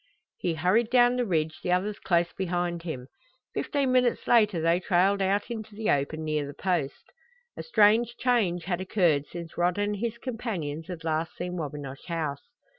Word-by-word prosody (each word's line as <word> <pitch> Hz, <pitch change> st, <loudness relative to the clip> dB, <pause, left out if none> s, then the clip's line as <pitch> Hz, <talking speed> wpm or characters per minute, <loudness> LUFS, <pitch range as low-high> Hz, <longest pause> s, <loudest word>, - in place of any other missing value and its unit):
He 170 Hz, -2 st, -1 dB
hurried 190 Hz, +9 st, +2 dB
down 245 Hz, 0 st, +5 dB
the 245 Hz, -2 st, 0 dB
ridge, 160 Hz, -3 st, 0 dB
the 180 Hz, -, -1 dB
others 200 Hz, +3 st, 0 dB
close 170 Hz, -2 st, +1 dB
behind 175 Hz, -2 st, -2 dB
him. 155 Hz, -7 st, -5 dB, 0.5 s
Fifteen 280 Hz, -3 st, 0 dB
minutes 250 Hz, -1 st, +2 dB
later 210 Hz, -7 st, +4 dB
they 165 Hz, +2 st, +2 dB
trailed 190 Hz, +2 st, +2 dB
out 200 Hz, +4 st, 0 dB
into 220 Hz, -2 st, -6 dB
the 215 Hz, 0 st, 0 dB
open 145 Hz, +3 st, 0 dB
near 155 Hz, -2 st, -1 dB
the 145 Hz, -, -9 dB
Post. 175 Hz, -7 st, -2 dB, 0.4 s
A -, -, -5 dB
strange 230 Hz, -, +3 dB
change 210 Hz, -9 st, +1 dB
had 185 Hz, 0 st, -2 dB
occurred 175 Hz, -7 st, +2 dB
since 170 Hz, -1 st, -8 dB
Rod 175 Hz, +1 st, +2 dB
and 205 Hz, 0 st, 0 dB
his 235 Hz, +2 st, -3 dB
companions 195 Hz, -, -4 dB
had 175 Hz, -3 st, -7 dB
last 160 Hz, +1 st, -2 dB
seen 180 Hz, 0 st, -4 dB
Wabinosh 145 Hz, -4 st, -6 dB
House. 155 Hz, -5 st, -2 dB
180 Hz, 175 wpm, -27 LUFS, 160-215 Hz, 0.5 s, down